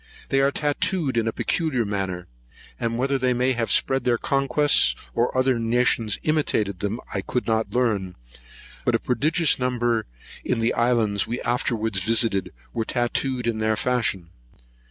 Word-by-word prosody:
They 135 - +2
are 140 +1 +3
tatooed 150 0 0
in 115 -1 +1
a - - +1
particular 135 -3 -1
manner; 95 -3 -3 0.5
and 115 0 -1
whether 135 +2 0
they 125 -1 +1
may 125 +2 +2
have 115 -3 -1
spread 135 -1 +2
their 120 -1 +2
conquests, 135 - +3 0.2
or 120 +2 0
other 130 -2 +2
nations 115 -2 +1
imitated 110 - 0
them, 105 +3 -2
I 100 - -1
could 125 +5 -2
not 110 0 -1
learn; 105 -7 0 0.7
but - - +2
a - - +2
prodigious 155 +5 +1
number, 120 -2 0 0.4
in 125 - 0 0.2
islands 115 -4 +1
we 120 - -3
afterwards 110 -4 -1
visited, 110 0 +1 0.2
were 115 - -1
tatooed 125 +2 -1
in 115 -2 -1
their 110 0 +1
fashion. 105 -8 -1
120 Hz, 155 wpm, -24 LUFS, 110-130 Hz, 0.7 s, are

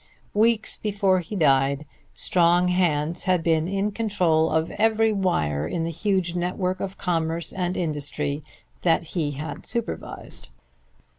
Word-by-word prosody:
Weeks 220 +1 +2
before 200 -3 +1
he 180 +4 -6
died 140 -3 +2 0.3
strong 175 -2 +3
hands 170 -2 +1
had 180 -3 +2
been 160 -1 +2
in 195 +2 -1
control 180 -7 +1
of 160 +1 0
every 225 0 +2
wire 80 - 0
in 165 - -2
the 165 - -2
huge 185 0 0
network 180 +1 -1
of 195 0 -5
commerce 165 -2 -1
and 180 -1 -2
industry 150 -3 -1 0.4
that 170 -1 +3
he 150 -5 -1
had 150 +3 -6
supervised. 235 - -4
175 Hz, 135 wpm, -24 LUFS, 160-195 Hz, 0.4 s, strong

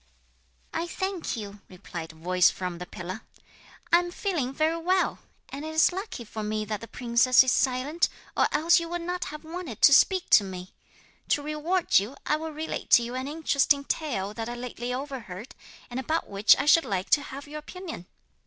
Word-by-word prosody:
'I 330 +1 -2
thank 375 -5 -3
you,' 205 -2 -8
replied 170 -3 -8
a - - -19
voice 180 +2 +3
from 180 -2 -5
the 180 - -7
pillar, 185 +5 -7 0.7
'I 345 - +8
am 350 0 -3
feeling 340 -10 -2
very 315 +4 +1
well. 365 +2 +1 0.3
And 280 - -7
it 315 0 -6
is 320 - +5
lucky 370 - -6
for 215 0 -6
me 215 0 -2
that 210 -1 -4
the 230 - -8
princess 245 +1 +4
is 260 - +1
silent, 265 +7 +1 0.3
or - - +4
else 335 +3 +4
you 335 0 -5
would 345 0 -3
not 355 +1 -3
have 300 +1 -8
wanted 320 - -7
to 280 - +9
speak 370 +5 +4
to 215 - +8
me. 185 -1 -8 0.5
To 290 - +1
reward 305 - +2
you, 215 +8 -6
I 300 - +2
will 320 +1 -5
relate 310 +1 -5
to 240 - +8
you 240 +1 -5
an 260 +1 -3
interesting 285 -2 +2
tale 225 -11 -2
that 225 +1 -5
I 240 - -4
lately 245 0 -5
overheard, 250 -6 -6 0.4
and 245 - -3
about 315 +5 -1
which 200 +1 +5
I - - -1
should 330 +2 +6
like 190 -2 -3
to 290 - +5
have 280 0 -8
your 300 +1 -6
opinion.' 325 - -8
275 Hz, 200 wpm, -27 LUFS, 215-325 Hz, 0.7 s, to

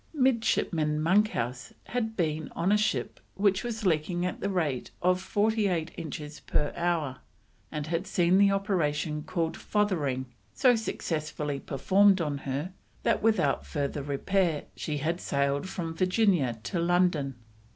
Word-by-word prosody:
Midshipman 220 - +2
Monkhouse 155 - +1
had 225 -2 -3
been 155 -3 -1
on 185 +4 +1
a - - +6
ship 215 +1 -1 0.2
which 195 -1 +2
was 225 -3 -4
leaking 175 +1 +1
at 180 - -3
the 200 - -1
rate 155 -9 -1
of 180 +1 +2
forty 210 +2 +1
eight 170 -3 -1
inches 150 -1 -6
per 145 - -1
hour, 165 -7 0 0.5
and 150 -1 -3
had 165 +4 -2
seen 180 +1 +3
the 200 0 +6
operation 160 -7 0
called 165 +1 -2
"fothering" 155 -11 0 0.3
so 250 -2 +5
successfully 155 -9 -3
performed 190 +9 +3
on 150 -4 -1
her, 145 +8 -3 0.3
that, - - +2
without 220 0 +2
further 145 -1 -3
repair, 155 +3 0
she 150 -2 -3
had 165 +5 -1
sailed 140 +4 0
from 165 -4 -4
Virginia 180 - +2
to 170 +9 -2
London. 170 -6 +2
170 Hz, 140 wpm, -28 LUFS, 150-195 Hz, 0.5 s, a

